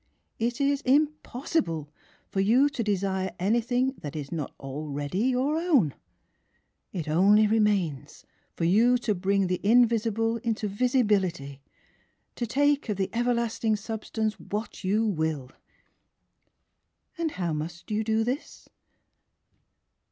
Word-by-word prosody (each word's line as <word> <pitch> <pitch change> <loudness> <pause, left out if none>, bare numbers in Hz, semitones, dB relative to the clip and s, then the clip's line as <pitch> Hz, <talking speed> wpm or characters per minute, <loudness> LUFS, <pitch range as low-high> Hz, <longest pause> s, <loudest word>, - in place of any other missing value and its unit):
It 235 +1 -1
is 280 0 +1
impossible 265 - 0 0.4
for 195 - -3
you 240 +9 +4
to 275 -5 -3
desire 190 -2 -1
anything 240 +7 +1
that 145 0 -7
is 145 -3 -5
not 155 -5 -3
already 145 - -3
your 260 +4 +1
own! 280 - +3 1.0
It 165 -4 -4
only 200 +7 +5
remains 195 -10 0 0.3
for - - -3
you 225 +9 +4
to 235 -3 -1
bring 195 +1 +1
the 180 0 -1
invisible 225 0 +3
into 225 -2 -2
visibility 200 - 0 0.4
— - - -42
to 240 - -2
take 285 +1 +1
of 205 - -1
the 190 -1 -1
everlasting 235 -2 0
sub 220 +1 -5
stance 220 -1 -2
what 210 +1 -5
you 210 +4 +1
will! 160 -9 -2 1.7
"And 330 -1 0
how 175 -3 -2
must 165 +5 -6
you 215 +1 0
do 220 0 +1
this? 255 +6 -5
215 Hz, 125 wpm, -27 LUFS, 180-240 Hz, 1.7 s, only